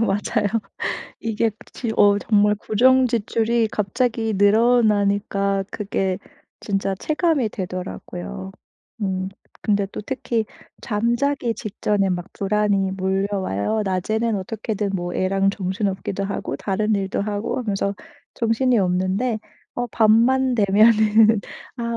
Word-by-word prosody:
맞아요. 210 0 0 0.7
이게 225 0 0 0.2
지 235 - -4
어 205 0 +5
정말 210 0 +3
고정 255 +5 +3
지출이 230 0 +1
갑자기 225 +1 -1
늘어나니까 205 -2 +3
그게 190 -2 -2 0.4
진짜 195 -1 -1
체감이 305 - 0
되더라고요. 185 0 -6 0.5
음. 190 -1 -1 0.3
근데 205 -1 +1
또 - - -5
특히 230 -1 -2 0.3
잠자기 235 +4 0
직전에 205 -2 -1
막 180 0 -3
불안이 200 -1 +1
몰려와요. 190 - -1
낮에는 215 +4 0
어떻게든 210 +1 -3
뭐 175 -1 -3
애랑 195 +1 +2
정신없기도 195 0 -2
하고, 200 - -3
다른 210 +2 0
일도 195 -1 -1
하고 205 +4 -2
하면서 200 -4 -1 0.4
정신이 235 +2 +2
없는데 190 +5 0 0.4
어 245 - -2
밤만 235 +4 +3
되면은 215 +1 +5 0.4
아 240 - -5
210 Hz, 255 characters per minute, -22 LUFS, 195-225 Hz, 0.7 s, 어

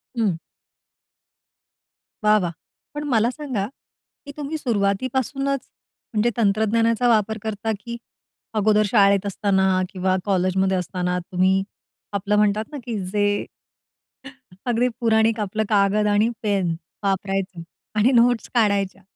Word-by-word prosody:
हं. 205 -8 +1 1.9
वाह! 210 0 +5
वाह! 170 - -1 0.4
पण 295 0 -4
मला 225 +1 +3
सांगा, 255 -9 -3 0.6
की 285 - -7
तुम्ही 295 +2 -3
सुरुवातीपासूनच, 260 +4 0 0.5
म्हणजे 215 +3 +2
तंत्रज्ञानाचा 225 +3 +2
वापर 220 -1 +2
करता? 220 0 -2
की 235 +2 -6 0.6
अगोदर 215 +1 +4
शाळेत 200 -3 +4
असताना 195 -1 +1 0.2
किंवा 185 -1 0
कॉलेजमध्ये 190 0 +1
असताना 180 0 -2
तुम्ही, 185 +2 +1 0.6
आपलं 210 +2 0
म्हणतात 210 +1 +1
ना, 295 - -5
की 230 -3 -3 0.2
जे, 205 0 +2 1.4
अगदी 245 +1 +2
पुराणिक 225 -1 +2
आपलं 215 +1 -1
कागद 210 0 +3
आणि 215 +3 +3
पेन 190 -5 +1 0.3
वापरायचे 195 -2 -2 0.4
आणि 240 +5 +4
नोट्स 240 -1 +2
काढायच्या. 200 -4 +1
210 Hz, 115 wpm, -22 LUFS, 195-230 Hz, 1.9 s, वाह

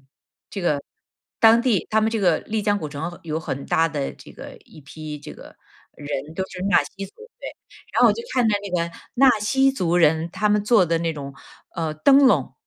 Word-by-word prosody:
个 135 - -32 1.3
当 225 +1 +6
地 235 -7 0
他 220 0 +2
们 220 - +1
这 225 - -1
个 175 -5 +3
丽 215 0 -3
江 205 0 +1
古 155 -6 -5
城 160 +5 -6
有 160 0 -3
很 140 -3 -5
大 165 0 +2
的 145 -3 -4
这 - - -15
个 - - -11
一 - - -16
批 150 +2 -8
这 145 - -10
个 - - -14 0.4
人 145 +1 -6
都 190 - -1
是 180 - -8
纳 - - +4
西 195 0 -9
族， 195 - -17 0.3
对， - - -6 0.5
然 - - +3
后 - - +8
我 - - +2
就 - - -6
看 250 -3 +2
到 210 - +2
那 200 - -7
个 170 -2 -2 0.2
纳 270 +2 +5
西 270 +6 +2
族 175 -9 0
人， 160 0 +2
他 195 +5 -1
们 210 0 +2
做 210 -3 +4
的 165 0 0
那 165 0 -1
种， 140 -2 -8 0.4
呃， 160 -3 -2
灯 275 - +5
笼。 145 - +1
175 Hz, 230 characters per minute, -22 LUFS, 155-215 Hz, 1.3 s, 后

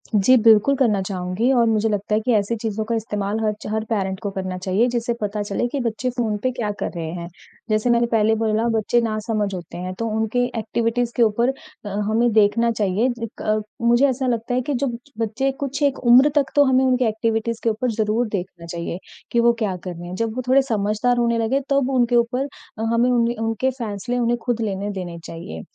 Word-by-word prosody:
जी, 210 +6 +5
बिल्कुल 225 +4 +5
करना 220 -7 +2
चाहूँगी 185 +5 -1
और 240 -2 +4
मुझे 220 0 +2
लगता 205 0 -2
है 215 - +3
कि 245 - 0
ऐसी 205 +3 +1
चीज़ों 220 -1 -2
का 230 0 -1
इस्तेमाल 210 -1 -2
हर 215 -1 +1
च - - -7
हर 220 0 0
पेरेंट 190 -4 -1
को 200 - -2
करना 185 -1 -4
चाहिए 190 +6 +1
जिससे 235 0 -1
पता 210 0 -2
चले 205 +4 -1
कि 275 +3 -3
बच्चे 235 +2 -2
फ़ोन 220 -3 0
पे 255 - +1
क्या 230 -5 -2
कर - - -2
रहे 165 -1 -4
हैं? 170 -1 -6 0.4
जैसे 215 +3 +1
मैंने 235 0 +4
पहले 220 0 +3
बोला 220 +1 0
बच्चे 220 +3 +2
नासमझ 215 -2 -1
होते 175 -2 -7
हैं 185 +1 -4
तो 230 - -1
उनके 220 +2 0 0.2
एक्टिविटीज़ 230 +2 -1
के 240 - +4
ऊपर 235 +3 +2 0.4
अ, - - -4 0.2
हमें 230 +2 +2
देखना 225 +2 +3
चाहिए 215 +3 +1 0.3
क 215 0 0 0.3
मुझे 245 +4 +5
ऐसा 260 +1 -1
लगता 235 0 -1
है 255 - +1
कि 285 +3 -3
जब 245 -2 -1 0.2
बच्चे 230 +5 0
कुछ 280 +1 -3
एक 280 -1 +2
उम्र 255 +5 +7
तक 280 -2 +2
तो 290 - +7
हमें 260 0 +3
उनकी 255 -1 +2
एक्टिविटीज़ 225 +1 -1
के 230 - +3
ऊपर 235 +3 -1
ज़रूर 220 +2 0
देखना 185 -4 -5
चाहिए, 170 +1 -5 0.3
कि 235 - +2
वो 235 0 +5
क्या 205 -4 -1
कर 185 - -4
रहे 175 +1 -8
हैं? 180 - -6
जब 225 +2 -2
वो 255 - -2
थोड़े 270 +2 +5
समझदार 220 0 0
होने 235 -1 +2
लगे 230 +5 +1
तब 275 -2 +2
उनके 245 -1 +2
ऊपर 245 +3 +1 0.3
अ, 220 - -5
हमें 240 +2 +3
उने 235 0 +2
उनके 225 +3 0
फैसले 240 -1 -4
उन्हें 240 0 +1
खुद 240 -2 0
लेने 200 -1 -2
देने 180 -3 -6
चाहिए। 80 - -7
225 Hz, 220 wpm, -22 LUFS, 205-240 Hz, 0.4 s, उम्र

